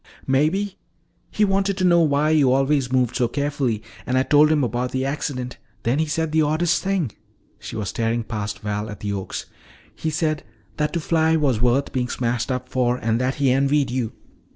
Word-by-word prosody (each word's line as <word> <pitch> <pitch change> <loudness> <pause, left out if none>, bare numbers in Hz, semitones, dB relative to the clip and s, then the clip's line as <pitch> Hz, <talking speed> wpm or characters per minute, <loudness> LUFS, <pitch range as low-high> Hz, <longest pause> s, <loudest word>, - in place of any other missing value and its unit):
"Maybe. 165 +9 +1 0.5
He 210 - +2
wanted 195 0 +1
to 185 - -1
know 175 -1 +5
why 150 0 +2
you 145 -5 +4
always 135 -1 +2
moved 125 -2 +1
so 125 -3 +2
carefully. 140 -6 -1 0.2
And 130 - +1
I 130 - +4
told 150 +2 +5
him 150 -3 +3
about 125 +1 -2
the 130 0 0
accident. 135 -3 -3 0.3
Then 125 +5 +1
he 160 - +1
said 160 +1 -1
the 160 0 +3
oddest 155 +4 +1
thing 190 - 0 0.3
" - - -38
She 110 +2 -8
was 105 -3 -3
staring 115 0 -1
past 105 -2 -4
Val 105 +1 -3
at 105 -2 -8
the 100 -1 -2
oaks. 95 -1 -4 0.5
"He 160 - -3
said 155 -1 -1 0.3
that 150 0 0
to 170 - 0
fly 160 0 +2
was 135 -8 +1
worth 125 +3 +2
being 125 -2 -1
smashed 120 0 -1
up 125 0 -3
for 125 -1 +1
and 115 0 0
that 130 +1 0
he 140 -3 +2
envied 140 +1 +2
you." 125 -3 -2
135 Hz, 200 wpm, -22 LUFS, 120-155 Hz, 0.5 s, know